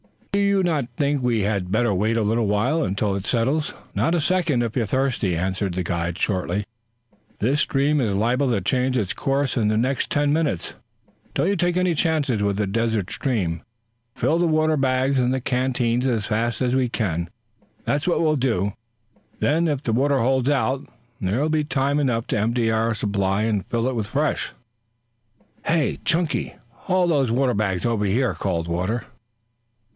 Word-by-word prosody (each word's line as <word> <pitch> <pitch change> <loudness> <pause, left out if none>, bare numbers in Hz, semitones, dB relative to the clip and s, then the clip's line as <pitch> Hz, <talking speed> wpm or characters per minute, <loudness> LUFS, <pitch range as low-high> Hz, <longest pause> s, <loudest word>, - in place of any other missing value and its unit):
"Do 200 - +1
you 200 -1 +3
not 155 -8 0
think 145 -2 +1
we 120 -3 +1
had 100 -3 -1
better 110 0 +2
wait 110 +5 +1
a 115 - +1
little 110 +1 +1
while 120 +11 +1
until 100 +1 -1
it 100 0 -4
settles?" 130 +6 0 0.2
"Not 165 - +1
a 170 - +1
second, 160 -7 +1
if 115 -2 -3
you're 120 -4 +1
thirsty," 125 -6 0
answered 95 +2 -1
the 90 +1 -2
guide 85 0 -2
shortly. 100 +1 -1 0.7
"This 135 +8 +1
stream 145 +2 +2
is 105 -5 0
liable 125 +6 +1
to 115 -5 +1
change 125 +6 +1
its 100 -6 -1
course 135 -1 -1
in 110 -3 +2
the 110 0 +1
next 130 +4 0
ten 145 0 +1
minutes. 150 - -1 0.6
Don't 175 - +2
you 200 - +2
take 175 -1 +1
any 185 -1 +2
chances 150 - +1
with 100 0 0
a - - +1
desert 110 -1 -1
stream. 90 - -1 0.5
Fill 165 - +1
the 175 - +3
water 155 -1 +2
bags 130 0 +1
and 125 0 +2
the 130 - -1
canteens 125 -1 0
as 115 -5 0
fast 115 +3 -1
as 125 -1 +1
we 130 -2 +1
can 85 -8 -2 0.5
that's 145 +4 -1
what 175 - +2
we'll 155 -2 +2
do. 110 -7 0 0.7
Then, 165 +3 +2
if 145 -2 -1
the 115 - 0
water 140 +4 +2
holds 130 +2 +2
out, 135 -1 0 0.3
there 100 +7 0
will 155 - +1
be 155 -1 +1
time 140 0 0
enough 120 -5 0
to - - 0
empty 115 +1 +1
out - - +1
our 115 +1 +1
supply 100 -1 0
and 105 -3 0
fill 120 +2 0
with 110 -4 -2
fresh." 145 +6 -1 1.1
"Hey, 160 -3 +1
Chunky! 170 -2 0 0.2
Haul 180 +9 0
those 140 -6 +2
water 125 +1 +2
bags 100 -3 -1
over 115 -3 +1
here," 120 +6 +1
called 85 -4 -2
Walter. 95 +7 -2
125 Hz, 185 wpm, -23 LUFS, 105-145 Hz, 1.1 s, you